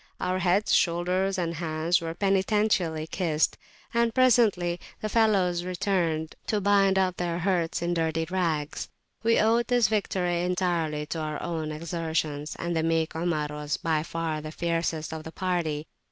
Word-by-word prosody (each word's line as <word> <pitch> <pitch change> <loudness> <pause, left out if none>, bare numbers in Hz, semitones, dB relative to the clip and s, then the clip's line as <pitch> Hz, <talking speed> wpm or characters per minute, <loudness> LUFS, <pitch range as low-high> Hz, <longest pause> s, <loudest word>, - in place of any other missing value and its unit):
Our 185 +1 -1
heads, 185 +4 +2
shoulders, 180 +3 +2
and 170 -2 -1
hands 165 +1 0
were 165 0 -4
penitentially 195 -4 +1
kissed, 160 -4 +1 0.4
and 235 -1 +2
presently 215 -9 +3 0.2
the 215 - -3
fellows 195 -6 +2
returned 175 -4 -1
to 210 - +1
bind 195 -1 +3
up 185 -2 +1
their 170 -1 -1
hurts 175 -2 0
in 175 0 0
dirty 165 -1 0
[p.194] 165 - -15
rags. 165 -5 -1 0.3
We 230 0 +3
owed 230 +2 +3
this 245 -5 +3
victory 180 -5 0
entirely 175 -4 0
to 160 +2 -4
our 155 -1 -3
own 160 -2 -3
exertions, 160 -2 -3
and 170 0 -2
the 160 - +2
meek 165 0 0
Omar 160 -3 -1
was 150 0 -3
by 160 -2 0
far 160 -1 -3
the 155 0 -7
fiercest 165 -1 -2
of 160 -1 -6
the 160 - -8
party. 170 -5 -1
170 Hz, 160 wpm, -27 LUFS, 160-190 Hz, 0.4 s, presently